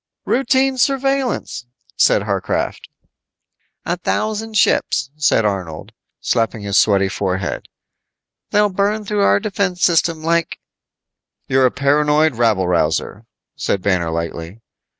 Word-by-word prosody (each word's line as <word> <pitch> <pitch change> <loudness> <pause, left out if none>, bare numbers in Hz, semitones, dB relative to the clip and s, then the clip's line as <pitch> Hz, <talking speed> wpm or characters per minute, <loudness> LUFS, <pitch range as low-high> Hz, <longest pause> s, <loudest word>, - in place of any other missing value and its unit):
"Routine 265 0 +1
surveillance," 270 - -1 0.3
said 100 - +3
Warcraft. 100 -3 -3 1.0
"A 175 - -1
thousand 215 +4 -2
ships," 130 -9 +1
said 145 -7 +2
Arnold, 90 -6 -4 0.3
slapping 115 -2 -1
his 100 -1 -3
sweating 100 -3 +4
forehead. 95 -2 -3 0.8
"They'll 210 0 +3
burn 205 +3 -1
through 205 0 -1
our 200 - +4
defense 200 -4 -2
system 165 -2 +2
like 165 0 0 0.5
" - - -58
"You're 130 -1 +3
a - - -2
paranoid 150 +2 +2
rabble 110 -6 +1
rouser," 90 +6 -1 0.3
said 95 - -2
Banner 90 -4 0
lightly. 85 +4 -5
140 Hz, 115 wpm, -18 LUFS, -, 1.0 s, sweating